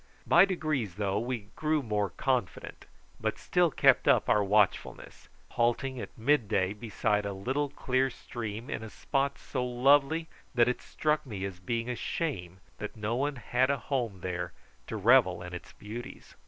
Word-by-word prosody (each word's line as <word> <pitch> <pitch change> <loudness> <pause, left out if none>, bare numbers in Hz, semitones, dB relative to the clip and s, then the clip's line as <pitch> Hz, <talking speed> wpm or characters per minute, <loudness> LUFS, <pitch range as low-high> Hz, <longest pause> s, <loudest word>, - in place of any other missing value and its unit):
By 175 +3 +7
degrees, 155 - -2
though, 100 0 0
we 115 -3 -4
grew 155 -1 0
more 105 -3 0
confident, 125 -2 -2 0.3
but - - -1
still 175 -1 +2
kept - - +4
up - - +4
our 105 - +4
watchfulness, 100 0 0 0.2
halting 120 +2 0
at - - -9
mid 125 0 +2
day 95 0 +1
beside 105 -1 -1
a 100 0 -3
little 130 +9 -1
clear 130 0 0
stream 115 -2 -6
in - - -4
a 110 - -7
spot 140 +4 -1
so 130 -3 -3
lovely 140 +6 +3 0.3
that 120 -1 +5
it 125 - -1
struck 150 0 0
me 105 -7 -5
as 95 -2 -6
being 115 +5 -2
a 125 - -2
shame 95 - -3 0.2
that 105 +1 -6
no 110 +2 -1
one 140 +3 0
had 125 +2 +1
a 140 - +2
home 120 -7 -3
there 90 -1 -3 0.3
to 110 - -4
revel 105 -5 +4
in 90 0 -8
its 90 - -8
beauties. 120 +5 -9
120 Hz, 170 wpm, -30 LUFS, 105-135 Hz, 0.3 s, By